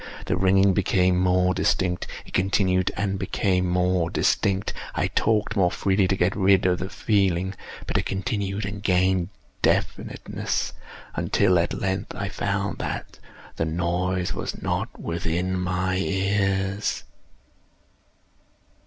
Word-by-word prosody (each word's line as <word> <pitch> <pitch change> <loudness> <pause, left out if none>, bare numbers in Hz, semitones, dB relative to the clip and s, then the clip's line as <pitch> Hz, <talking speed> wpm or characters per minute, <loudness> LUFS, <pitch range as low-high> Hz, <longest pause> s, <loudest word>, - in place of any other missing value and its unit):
The - - 0
ringing 95 +1 +4
became 90 -1 +2
more 90 0 +3
distinct:—it 90 -1 -1
continued 95 -1 +2
and 95 -1 -1
became 90 -2 0
more 90 -1 +1
distinct: 95 +3 +1 0.2
I - - +1
talked 105 -2 +1
more 95 -4 +4
freely 95 +1 +1
to 95 - +1
get 90 0 +1
rid 95 -2 +4
of 90 -1 +2
the 95 - -4
feeling: 95 -4 +1 0.3
but - - 0
it - - -3
continued 100 +1 -2
and 100 0 -5
gained 95 -2 +2 0.3
definiteness—until, 95 -3 -1
at 85 - -1
length, 95 -1 -2
I - - -3
found - - -2
that - - -5 0.4
the 80 - 0
noise 90 +2 -1
was - - -4
not - - -3
within 85 +2 -2
my 90 +1 0
ears. 95 +1 0
95 Hz, 120 wpm, -25 LUFS, 90-95 Hz, 0.4 s, ringing